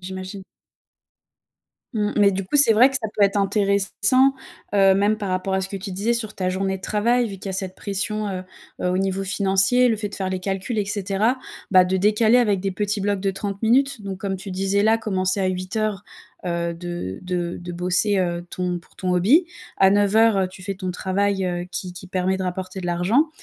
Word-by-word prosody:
j'imagine. 190 +1 -7 1.5
Mmh, 210 -1 0
mais 205 -2 +5
du 195 +1 -3
coup, 190 - 0
c'est 285 -5 +8
vrai 245 +5 +6
que 270 - 0
ça 235 -4 -2
peut 210 - +2
être 200 +1 +1
intéressant, 200 +6 +3 0.4
heu, 195 -1 +5
même 205 +2 +2
par 205 -2 -5
rapport 185 +1 -1
à 190 - +1
ce 190 - -3
que 195 - -5
tu 195 0 -6
disais 205 +6 0
sur 220 -2 -3
ta 185 -1 -2
journée 190 +1 -1
de 190 - -16
travail 235 +4 +1
vu 200 - -7
qu'il 190 - -11
y - - -2
a - - -4
cette 185 0 -4
pression, 210 +1 -2
heu, 185 -2 -4 0.4
heu, - - +1
au 180 - 0
niveau 195 0 -1
financier, 195 +5 +3
le 225 - +1
fait 210 -1 -4
de - - -9
faire 190 -1 -2
les 185 0 -3
calculs, 195 +5 -3
et 205 - +1
cetera, 205 +4 0 0.3
bah, 185 -2 +6
de 185 +1 0
décaler 215 +4 +3
avec 210 -5 +2
des 195 0 -2
petits 205 +2 -2
blocs 200 0 -1
de 195 0 0
30 195 +1 -5
minutes. 250 +1 +2
Donc, 195 -2 -6
comme 195 -1 -3
tu 195 +1 -8
disais 195 +2 0
là, 220 +1 +3
commencer 185 -3 -1
à 190 - +1
8:00, 190 +3 -2 0.4
heu, 170 -1 -2
de 170 - -6
de 175 -1 -3
de 175 0 -7
bosser, 185 +4 +1
heu, 175 -2 -1
ton 180 -1 -2
pour 170 - -22
ton 185 -1 -1
hobby, 250 - +4 0.3
à 190 - +6
9:00, 205 +2 +4
heu, 190 -1 +1
tu 185 0 -13
fais 195 +1 -4
ton 185 -1 -4
travail, 190 +2 -1
heu, 175 -1 -2
qui 185 -2 -5
qui 185 - -9
permet 185 +1 0
de 190 - -4
rapporter 185 +1 -4
de 180 - -5
l'argent 185 - +2
195 Hz, 225 wpm, -22 LUFS, 185-210 Hz, 1.5 s, c'est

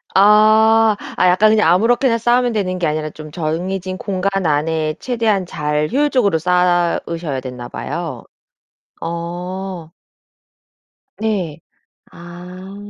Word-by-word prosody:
아 215 +2 +5 0.2
아 185 - +4
약간 185 +4 +4
그냥 215 -6 +3
아무렇게나 235 +4 +2
쌓으면 240 +1 +2
되는 185 -3 -2
게 165 - 0
아니라 155 0 -2
좀 155 0 -11
정해진 180 +4 -3
공간 195 -1 -2
안에 155 +1 0
최대한 225 -6 0
잘 150 -2 -2
효율적으로 255 - +2
쌓으셔야 175 -3 0
되나 125 -2 -7
봐요. 170 +1 -5 0.8
어. 175 +1 -5 1.3
네. 190 -8 -2 0.5
아. 180 +3 -11
180 Hz, 225 characters per minute, -18 LUFS, 165-210 Hz, 1.3 s, 아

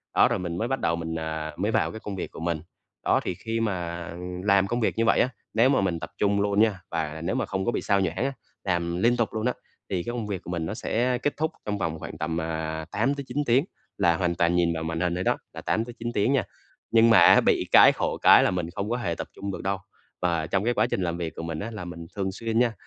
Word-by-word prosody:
đó, - - +6
rồi - - -1
mình 85 -2 -4
mới 115 - -1
bắt 135 +1 -1
đầu 85 - +1
mình, 80 0 -4
à, 80 -1 -4
mới 105 +4 0
vào - - +1
cái 110 - -7
công 100 -2 -6
việc - - -5
của - - -10
mình. 85 -2 -2 0.4
Đó, - - +4
thì 90 - -3
khi 115 +4 -3
mà 90 -5 -3 0.3
làm 100 -1 +4
công 120 +4 -1
việc - - 0
như 115 - +2
vậy - - +4
á, 125 - +3 0.2
nếu 115 +4 +4
mà 135 -6 +3
mình 90 -4 0
tập 80 - -6
trung 100 0 +2
luôn 100 0 +1
nha, 105 -4 +2
và 80 -1 -3
nếu 90 - -1
mà - - 0
không 95 0 -3
có 120 - +2
bị - - -2
sao 100 -1 +2
nhãng 95 -2 0
á, 135 +6 0 0.3
làm 85 -2 -1
liên 120 +6 +3
tục 115 -2 +1
luôn 110 0 -2
á 125 - +2 0.4
thì 90 -3 -1
cái 120 - -4
công 115 -3 -3
việc 95 -3 -3
của - - -9
mình 85 -2 -2
nó - - -3
sẽ 125 +2 0
kết 145 - -1
thúc 160 +1 0
trong 105 -1 -1
vòng 80 -4 -2
khoảng - - -7
tầm, 80 +1 -2
à, 80 0 -3
8-9 135 +4 -1
tiếng 130 +6 +3 0.3
là 85 -1 +3
hoàn 90 -2 0
toàn 85 0 +2
nhìn 85 -1 +2
vào 80 0 -3
màn 80 0 -3
hình 90 -1 0
thôi 90 - -2
đó, - - +2 0.2
là - - -7
8-9 115 +1 -2
tiếng 115 +6 +2
nha. 135 - +2 0.5
Nhưng 115 0 +6
mà 115 - +7
á - - +8
bị - - +2
cái - - +9
khổ - - -2
cái - - +8
là - - +2
mình 90 -2 -2
không 100 +2 -2
có 120 - 0
hề 85 -9 -2
tập - - -5
trung 100 0 -4
được - - -5
đâu, 95 +1 0 0.4
và 85 -3 0
trong 95 +3 0
cái 120 +2 +2
chương - - +2
trình - - -1
làm 85 -1 -1
việc 85 -2 -4
của 80 - -6
mình 80 -1 -4
á 115 +3 -4
là 105 -5 -6
mình 85 -1 -8
thường 95 -1 -1
xuyên 115 +3 -1
nha 120 -2 +3
95 Hz, 280 wpm, -26 LUFS, 85-115 Hz, 0.5 s, cái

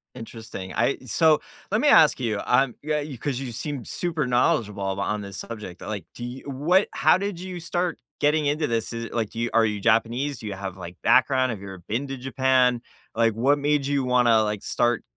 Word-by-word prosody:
Interesting. 110 -5 -8
I - - +1
so, 155 +6 +3 0.3
let 215 - +2
me 295 - +4
ask 155 - +6
you, 110 -4 -1
I'm 125 0 +3
yeah, 150 0 -1
you 145 -3 -7
'cause 135 +2 -3
you 130 -2 -5
seem 135 +2 -5
super 165 0 -2
knowledgeable 115 -4 +1
on 100 +2 -1
this 100 -1 -8
subject. 105 -6 -8
Like, 100 -6 -5
do 120 - -7
you 125 +2 -7
what 165 +9 +2
how 155 +4 +4
did 200 -1 -3
you 180 0 -6
start 175 0 -2 0.2
getting 150 +1 +3
into 150 +2 +1
this? 115 -2 -2
Is 115 0 -4
it, - - -9
like, 110 -3 -1
do 115 - -7
you 120 0 0
are 115 -1 +5
you 105 -2 -2
Japanese? 115 +5 +1
Do 110 - -7
you 100 - -3
have, 95 -1 -6
like, 90 -1 -8
background? 130 0 +4
Have 110 - -5
you 100 - -9
ever 95 -1 -8
been 120 +7 -1
to 135 - -4
Japan? 130 -1 +2 0.3
Like, 115 0 +2
what 135 +6 +2
made 145 -1 +1
you 140 -1 0
wanna, 125 -3 +4
like, 105 -1 -3
start 120 -1 +1
125 Hz, 220 wpm, -24 LUFS, 110-145 Hz, 0.3 s, ask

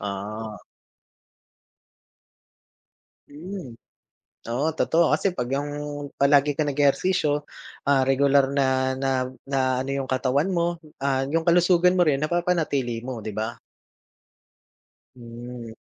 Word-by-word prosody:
Ah. 105 +2 -5 2.7
Hmm, 155 -4 -8 0.7
oo 130 +6 0
totoo 160 +1 +2
kasi 190 -2 +1
pag 125 +2 -3
yung 145 +1 -1 0.5
palagi 140 +1 +3
kang 150 -2 0
nag-eehersisyo, 145 +1 +1 0.4
ah, 135 -2 +4
regular 135 0 +4
na 130 -1 +1
na 130 -1 0 0.2
na 135 0 -1 0.3
ano 135 - -5
yung 135 - -5
katawan 135 +5 +1
mo, 170 -2 -1 0.2
ah, 135 -1 +1
yung 165 +2 0
kalusugan 175 +1 +4
mo 185 - +1
rin 145 0 +1
napapanatili 155 -9 0
mo, 125 -3 -5
di 105 -1 -7
ba? 110 +2 -3 1.6
Hmm. 120 0 -9
140 Hz, 110 wpm, -24 LUFS, 125-160 Hz, 2.7 s, ah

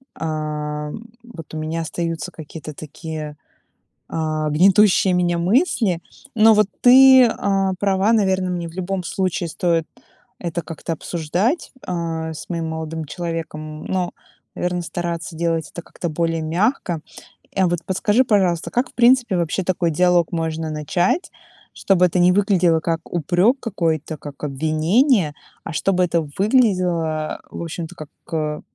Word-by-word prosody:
а, 150 -1 -3 0.3
вот 175 -11 -11
у - - -4
меня 160 +1 -3
остаются 165 +2 -3
какие-то 155 0 -9
такие, 155 0 -7 0.7
а, 155 -1 -1
гнетущие 190 +4 +4
меня 175 -1 +1
мысли. 195 - +2 0.3
Но 220 0 +7
вот 210 -2 +4
ты, 260 +1 +8
а, 195 -4 0
права, 195 +1 +2
наверно, 190 -4 +1
мне 175 -1 -3
в 165 - -11
любом 185 +1 -3
случае 185 0 -2
стоит 165 -1 0 0.5
это 170 -1 -3
как-то 165 +1 -5
обсуждать, 175 - -1 0.2
а, 165 -2 -3
с 150 - -9
моим 165 -2 -2
молодым 160 0 -4
человеком, 155 -1 -5
но, 185 -2 -1 0.4
наверно, 180 0 -1
стараться 170 -1 -4
делать 165 -1 -1
это 175 - -7
как-то 175 - -6
более 165 +1 -1
мягко. 175 - 0 0.6
А 190 -1 +3
вот 175 -1 0
подскажи, 205 +6 +2
пожалуйста, 190 -7 +1
как, 245 +2 0
в - - -43
принципе, 240 -5 +4
вообще 170 +3 -1
такой 175 -1 0
диалог 180 +1 +3
можно 160 -1 -2
начать, 175 - 0 0.4
чтобы 180 -2 +3
это 180 +1 +1
не 180 +1 +5
выглядело 185 -4 +3
как 165 0 -1
упрёк 180 - +2
какой-то, 165 - -2
как 145 0 -11
обвинение, 155 - +2 0.3
а - - -6
чтобы 185 +3 +1
это 170 -1 +1 0.2
выглядело, 180 -9 +1
в - - -6
общем-то, 165 +1 -6
как, 155 -3 -9 0.2
э, 150 -1 -2
170 Hz, 140 wpm, -21 LUFS, 160-190 Hz, 0.7 s, ты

